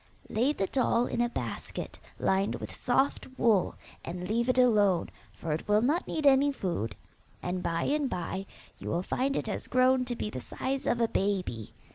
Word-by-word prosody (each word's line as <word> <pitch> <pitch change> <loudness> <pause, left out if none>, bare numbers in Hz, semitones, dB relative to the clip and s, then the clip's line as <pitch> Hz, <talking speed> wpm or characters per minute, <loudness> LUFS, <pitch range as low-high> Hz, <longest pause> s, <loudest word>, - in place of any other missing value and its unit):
Lay 245 +6 +2
the 195 -10 -1
doll 245 +1 +2
in 240 - -1
a 240 - +2
basket - - -5 0.2
lined 195 +1 +1
with - - -7
soft 265 +3 +1
wool, 220 -7 +3 0.3
and 180 +1 -5
leave 235 +3 +1
it 255 - +2
alone, 205 -8 +4 0.2
for 160 -2 -4
it 155 - -4
will 210 +1 +4
not 305 +8 +1
need 310 - -2
any 280 +1 +6
food, 170 - -3 0.5
and 180 0 -2
by 165 -1 -1
and 290 -2 +1
by 190 +2 -3 0.3
you - - -5
will 175 +2 0
find 270 +7 0
it - - -1
has - - -4
grown 255 0 +4
to 245 -1 -3
be 210 - -3
the 130 - -5
size 265 - -3
of 240 - +2
a 230 - +4
baby. 185 - -2
230 Hz, 190 wpm, -29 LUFS, 185-260 Hz, 0.5 s, any